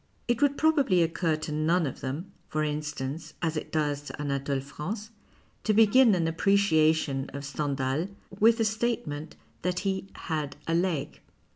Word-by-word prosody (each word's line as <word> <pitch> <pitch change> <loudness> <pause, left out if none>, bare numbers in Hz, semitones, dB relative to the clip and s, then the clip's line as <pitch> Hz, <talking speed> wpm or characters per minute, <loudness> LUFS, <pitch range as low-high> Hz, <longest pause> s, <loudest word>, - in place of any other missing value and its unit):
It 240 +2 +1
would 285 -1 +3
probably 285 - +4
occur 165 0 0
to 155 0 -5
none 160 +3 +2
of 135 - -4
them, 150 +9 -4 0.2
for 155 0 0
instance, 150 0 -4
as 165 -1 0
it 155 - -4
docs 145 -2 0
to - - -8
Anatole 140 -1 -1
France, 190 - -6 0.5
to 215 - +2
begin 225 +1 +6
an 165 -2 +1
appreciation 160 -6 +2
of 140 0 -5
Stendhal 140 +2 -1 0.3
with 225 +2 +6
the 225 - +2
statement 220 -9 -2 0.3
that 180 0 -1
he 195 -1 -2
" - - -24
had 155 -3 -2
a 165 - -1
leg." 170 -5 0
160 Hz, 160 wpm, -28 LUFS, 145-200 Hz, 0.5 s, begin